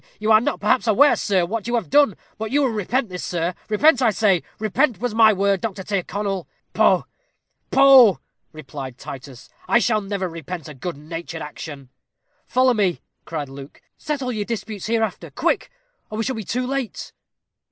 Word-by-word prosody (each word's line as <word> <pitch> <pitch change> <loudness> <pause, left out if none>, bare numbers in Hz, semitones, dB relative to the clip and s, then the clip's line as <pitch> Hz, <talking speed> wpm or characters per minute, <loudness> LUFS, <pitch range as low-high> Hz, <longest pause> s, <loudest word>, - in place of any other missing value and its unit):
You 215 +1 +1
are 215 0 +7
not 180 -6 -2
perhaps 215 +5 +1
aware, 270 +7 +5
sir, 190 -4 +1
what 220 +4 -4
you 240 - 0
have 210 -11 -2
done; 285 -9 +4 0.2
but 220 0 -3
you 285 +4 +2
will 265 - +2
repent 225 +3 -1
this, 180 -1 -6
sir 170 0 -2 0.2
repent, 270 +5 +4
I 240 - +4
say 195 -4 +2 0.2
repent 220 +1 +1
was 245 -1 -2
my 220 -1 +6
word, 200 -1 +1
Mr. 195 -4 -4
Tyrconnel." 195 -1 -2 0.3
"Poh! - - +3 0.6
poh!" 265 -7 +7 0.3
replied 140 -4 -8
Titus. 130 -2 -10 0.2
"I - - +4
shall 220 -2 +2
never 195 -2 -3
repent 165 -1 -7
a 150 - -8
good 145 +3 -6
natured 165 +1 -7
action." 145 -3 -9 0.6
"Follow 255 +1 +3
me," 195 -6 0 0.2
cried 155 -3 -4
Luke; 135 +1 -12
"settle 275 -4 -3
your 215 -3 -2
disputes 215 -2 -5
hereafter. 225 -1 -1
Quick, - - -1 0.4
or 215 - -6
we 225 - 0
shall 260 +2 -2
be 220 - -5
too 250 +6 -2
late." 265 -3 -4
210 Hz, 175 wpm, -22 LUFS, 170-235 Hz, 0.6 s, are